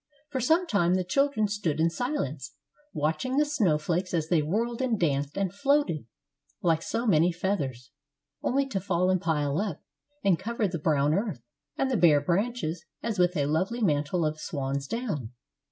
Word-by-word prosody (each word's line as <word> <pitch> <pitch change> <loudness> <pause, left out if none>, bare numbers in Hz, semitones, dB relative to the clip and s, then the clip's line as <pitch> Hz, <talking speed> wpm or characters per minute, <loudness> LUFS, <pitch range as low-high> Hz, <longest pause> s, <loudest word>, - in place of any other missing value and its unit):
For 260 - -1
some 325 +9 +3
time 180 - +2
the 185 - +1
children 220 +3 +1
stood 200 -7 -2
in 165 +1 +3
silence, 160 - -3 0.4
watching 160 - -1
the 300 - +4
snow 220 - +2
flakes 175 +4 -1
as 160 -1 -1
they 170 -3 +3
whirled 230 - -1
and 240 -5 0
danced 145 -2 0
and 195 -2 -1
floated 270 - +1 0.6
like 165 -2 +3
so 230 +7 -2
many 175 -4 +4
feathers, 140 -9 -3 0.5
only 275 +2 +1
to 195 - -1
fall 185 -1 +1
and 185 -2 +1
pile 150 -2 0
up 205 -1 -3 0.4
and 190 -4 +3
cover 225 +2 -1
the 175 -3 -4
brown 150 -1 +2
earth 190 - -2 0.3
and 270 0 0
the 250 - +2
bare 160 -5 +6
branches 175 +1 -1 0.2
as 220 -4 -2
with 180 0 +3
a 145 - +2
lovely 185 +11 0
mantle 155 0 +1
of 155 0 -2
swan's 140 -2 -3
down. 170 - -3
180 Hz, 175 wpm, -28 LUFS, 155-225 Hz, 0.6 s, bare